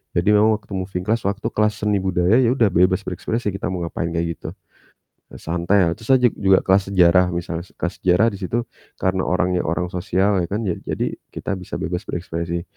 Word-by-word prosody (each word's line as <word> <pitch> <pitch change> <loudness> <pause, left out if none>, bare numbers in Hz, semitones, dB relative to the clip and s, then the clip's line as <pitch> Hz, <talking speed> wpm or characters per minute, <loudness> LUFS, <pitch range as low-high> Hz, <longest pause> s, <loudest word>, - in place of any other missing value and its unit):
Jadi 85 +4 +2
memang 110 +1 +4
waktu 105 0 -13
moving 95 -1 -3
class 110 0 0
waktu 100 +2 -3
kelas 105 0 0
seni 105 -1 +2
budaya 95 +4 +2
ya 125 0 +3
udah 115 -6 +3
bebas 90 +2 +3
berekspresi 105 +4 -3
kita 95 -1 -4
mau 90 -2 -3
ngapain 85 0 -3
kayak 85 0 0
gitu. - - -6 0.9
Santai 85 +4 +1 0.2
terus 110 - -13
ah - - +5
jug 120 - +4
juga 95 -1 +4
kelas 95 0 +3
sejarah 90 0 +5
misalnya 85 0 -4
se - - -24
kelas 90 - -4
sejarah 95 +5 +4
di 100 - -7
situ 110 +5 -2 0.4
karena 95 0 0
orangnya 90 0 +1
orang 90 +2 -1
sosial 95 +2 +1
ya - - -2
kan 105 +3 -2
ja 90 -4 0
jadi - - -1 0.2
kita 100 -2 -3
bisa 90 - -8
bebas 90 +2 -3
berekspresi. 85 0 -3
95 Hz, 200 wpm, -21 LUFS, 90-105 Hz, 0.9 s, ah